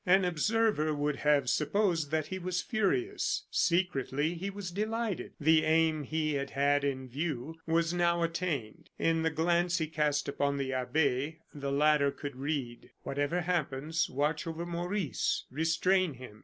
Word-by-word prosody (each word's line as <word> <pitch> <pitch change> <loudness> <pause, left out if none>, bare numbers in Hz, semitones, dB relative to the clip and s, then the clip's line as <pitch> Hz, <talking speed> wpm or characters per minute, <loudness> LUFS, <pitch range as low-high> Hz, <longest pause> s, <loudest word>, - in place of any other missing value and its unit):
An 190 -1 +4
observer 180 -2 +1
would 145 0 -1
have 145 -3 +3
supposed 165 - +1
that 155 0 0
he 190 - -5
was 180 0 -2
furious; 360 - 0
secretly, 160 -3 +1
he 180 +3 -4
was 200 -2 -6
delighted. 215 +1 -2
The 160 +1 +4
aim 160 0 +3
he 155 +1 -1
had 140 -1 -2
had 145 +1 +2
in 130 -2 -2
view 150 +2 -4
was 165 +1 +2
now 170 -1 +2
attained. 165 -9 -3
In 165 0 +1
the 160 - +2
glance 170 +2 +1
he 160 - 0
cast 150 -2 0
upon 140 0 0
the 135 -1 -2
abbe, 140 +3 0 0.2
the 140 -1 -4
latter 145 0 +4
could 140 -1 -6
read: 135 -3 -4
"Whatever 145 +5 -1
happens, 165 -2 -1
watch 150 +4 -1
over 165 +1 -4
Maurice; 175 -1 -1
restrain 165 +3 +2
him. 115 -4 -11
160 Hz, 155 wpm, -31 LUFS, 140-175 Hz, 0.2 s, An